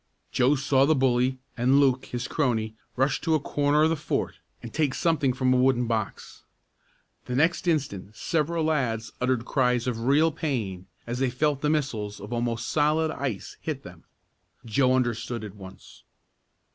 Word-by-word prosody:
Joe 130 +4 +3
saw 135 0 +3
the 155 +2 +3
bully, 130 -1 +2 0.2
and 130 +3 +3
Luke, 135 -2 +3
his 120 +1 -4
crony, 110 -7 0 0.2
rush 135 +3 +1
to 160 -1 +2
a - - +2
corner 145 +1 +2
of 160 - +3
the - - +2
fort - - -3 0.2
and 115 - -8
take 150 -4 +1
something 155 -6 +2
from 130 0 +1
a - - +3
wooden 125 -1 +3
box. 110 -3 -4 0.8
The 125 - -3
next 165 +6 +2
instant 110 - -1
several 165 +6 0
lads 125 -8 0
uttered 125 -2 +1
cries 125 -3 +1
of 115 -2 -2
real 155 +4 +4
pain, 110 - -3 0.2
as 120 +1 -4
they 130 -1 +2
felt 140 +3 0
the 150 - +1
missiles 115 -9 -1
of 105 +4 -7
almost 120 -1 -2
solid 155 +1 +2
ice 130 - -4
hit - - -4
them. - - -13 0.6
Joe 130 +3 +3
understood 120 -2 -1
at 105 -3 -7
once. 95 -2 -13
130 Hz, 170 wpm, -26 LUFS, 115-145 Hz, 0.8 s, real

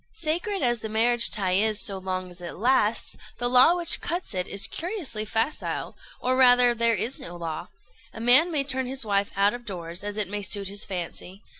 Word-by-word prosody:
Sacred 350 0 -2
as 240 -1 +1
the 220 - -6
marriage 230 +2 +5
tie 195 -4 +1
is 210 +3 +2
so 195 0 +1
long 185 -1 -5
as 175 0 -14
it 175 - -7
lasts, 230 0 0 0.2
the 245 - -1
law 255 +7 +5
which 340 -1 +4
cuts 345 -7 -4
it 180 -1 -2
is 200 0 0
curiously 330 - -4
facile, 225 +7 -3 0.2
or 255 +1 0
rather 250 -1 +5
there 230 0 +1
is 225 - -3
no 260 -10 -9
law: 170 0 -6 0.4
a - - -11
man 255 +9 +5
may 295 -3 0
turn 260 -2 -1
his 265 -1 -1
wife 200 -1 0
out 200 +1 +2
of 245 0 -8
doors, 175 -5 -7
as 205 0 -5
it 210 -3 -1
may 205 +2 -4
suit 200 0 -2
his 200 +1 -4
fancy. 185 +1 -7
220 Hz, 205 wpm, -25 LUFS, 195-260 Hz, 0.4 s, marriage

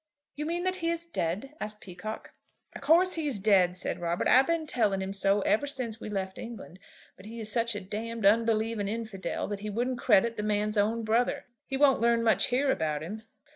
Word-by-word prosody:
"You 300 +1 -4
mean 345 +2 -2
that 370 0 0
he 335 -2 -1
is 335 0 -2
dead?" 215 - -3
asked 210 0 -4
Peacocke. 195 +4 -8 0.4
"Of - - -9
course 340 +6 +4
he's 295 -8 -1
dead," 190 -3 +3
said - - -3
Robert. 170 0 -1
"I've 260 +1 +6
been 335 -1 0
telling 215 -9 +1
him 190 0 -4
so 200 +1 +2
ever 225 +8 +1
since 235 -5 -3
we - - -6
left 190 -2 -4
England; 220 -6 -9 0.4
but 190 - -13
he 230 +1 -8
is 220 -1 -3
such 235 -1 0
a 205 - -4
d 210 +4 -5
unbelieving 225 -1 +1
infidel 220 -2 -4
that 205 -1 -4
he 210 +1 -5
wouldn't 240 +4 -2
credit 230 +1 +3
the - - -1
man's 210 0 0
own 220 +3 +1
brother. 230 +3 0 0.2
He 270 - -1
won't 275 -4 +4
learn 235 0 +3
much 225 -1 +4
here 265 +2 +1
about 155 - -1
him." 210 +7 -6
220 Hz, 210 wpm, -28 LUFS, 200-250 Hz, 0.4 s, I've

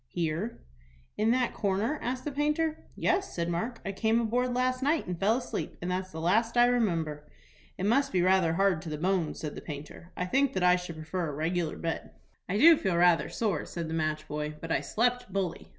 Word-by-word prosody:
"Here." 170 +6 -2 0.6
"In 215 +1 +1
that 250 0 +2
corner?" 210 +8 0
asked 255 +1 -3
the 295 - -2
painter. 300 +2 0
"Yes," 375 +1 0
said 170 -1 -1
Mark; 225 +8 -2
"I 195 - -1
came 220 +3 +1
aboard 245 +2 0
last 255 +1 0
night, 295 +4 +1
and 180 -2 -4
fell 215 +5 +3
asleep, 250 - -4
and 180 +1 -3
that's 185 0 -3
the 160 - -6
last 225 +8 +1
I 240 - +7
remember." 165 -12 0 0.5
"It 185 - -2
must 275 +6 +2
be 180 -2 +2
rather 185 -3 +3
hard 190 -2 +2
to 165 - -7
the 150 - -3
bones," 180 -1 0
said 150 -2 -4
the - - -8
painter. 150 +3 -9
"I 180 - -1
think 270 +8 +2
that 190 - -1
I 180 0 +6
should 180 -2 -5
prefer 160 +2 -3
a - - -5
regular 165 +2 -1
bed." 165 -1 -4 0.4
"I 195 - 0
do 320 +7 +8
feel 190 -8 0
rather 175 -1 +4
sore," 215 -5 -1
said 170 -2 -4
the 160 - -4
match 155 -1 -1
boy; 150 0 -4
"but 165 - -6
I - - +2
slept 245 -1 0
bully." 185 -3 -3
190 Hz, 215 wpm, -29 LUFS, 165-240 Hz, 0.6 s, do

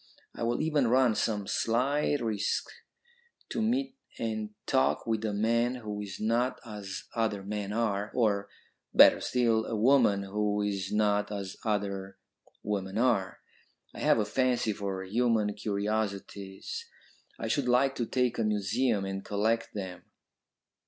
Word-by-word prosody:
I - - -10
will 120 +4 0
even 150 -5 +2
run 125 -1 +4
some 105 -2 -1
slight 135 +7 +1
risk 110 -3 -1 0.8
to 230 - -2
meet 255 +4 0 0.2
and 110 -2 -2 0.2
talk 130 -1 +2
with 110 -1 -1
a 110 - 0
man 115 +4 +1
who 105 -4 -5
is 100 -2 -7
not 120 +4 +1
as 105 -4 -6
other 110 -4 -1
men 100 0 -4
are, 105 -2 -1
or, 100 -4 +1 0.5
better - - +8
still, 115 -3 +2
a 115 - -2
woman 110 -3 +4
who 105 +1 0
is 100 -2 -2
not 105 -1 +2
as 100 -2 -4
other 100 -3 -2 0.5
women 100 -1 -2
are. 115 -6 +1 0.5
I - - -9
have - - +4
a 110 - +1
fancy 125 -1 +1
for 100 -2 -4
human 110 +1 +1
curiosities; 100 -2 -3 0.5
I 115 - -4
should 125 +4 0
like 130 +2 +4
to 120 - -1
take 125 -2 0
a - - +2
museum 105 +1 +1
and 95 0 -4
collect 110 +4 0
them." 95 -3 -6
110 Hz, 145 wpm, -29 LUFS, 100-120 Hz, 0.8 s, better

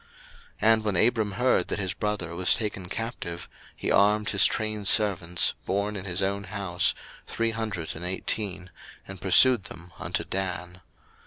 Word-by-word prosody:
01:014:014 115 - +6
And 110 -1 -1
when 105 -3 -1
Abram 110 0 +2
heard 125 +6 +1
that - - -2
his 95 -3 -2
brother 100 -5 -3
was 90 +1 +3
taken 100 -5 -5
captive, 90 -6 -5 0.3
he - - -3
armed 105 +1 +3
his 100 - +6
trained 110 -2 -2
servants, 90 -6 +3
born 100 +2 -1
in 95 -1 -6
his 95 +1 -2
own 100 +1 -2
house, 95 -3 0 0.3
three 115 0 -1
hundred 110 -8 -4
and 80 - -8
eighteen, 95 0 -3 0.4
and 95 -2 -10
pursued 105 +3 +6
them 90 -2 -10
unto - - -3
Dan. 90 -1 -5
100 Hz, 160 wpm, -26 LUFS, 90-105 Hz, 0.4 s, 01:014:014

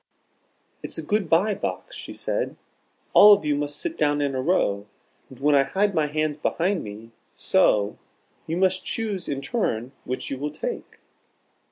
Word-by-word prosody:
"It - - -5
is - - -8
a - - -4
Good 205 -5 0
by 195 +6 +3
Box," 95 - -5
she - - -8
said. - - -3 0.6
"All 210 +1 +10
of 200 -6 +1
you 150 -1 +2
must 145 0 -2
sit 340 -1 -4
down 145 0 +2
in 140 -1 0
a 130 - -1
row, 105 - +1 0.4
and 130 - -13
when 145 +2 +3
I 140 - +6
hide 200 +8 +1
my 155 -3 +1
hands 155 0 -1
behind 175 +5 0
me, 110 +2 -9 0.2
so, 105 -1 +2 0.5
you 165 - -2
must 185 0 +2
choose 210 -5 -3
in 140 -1 -3
turn 130 - -1
which 130 - -4
you 135 - -3
will 145 +2 -2
take." - - -6
150 Hz, 180 wpm, -24 LUFS, 135-190 Hz, 0.6 s, All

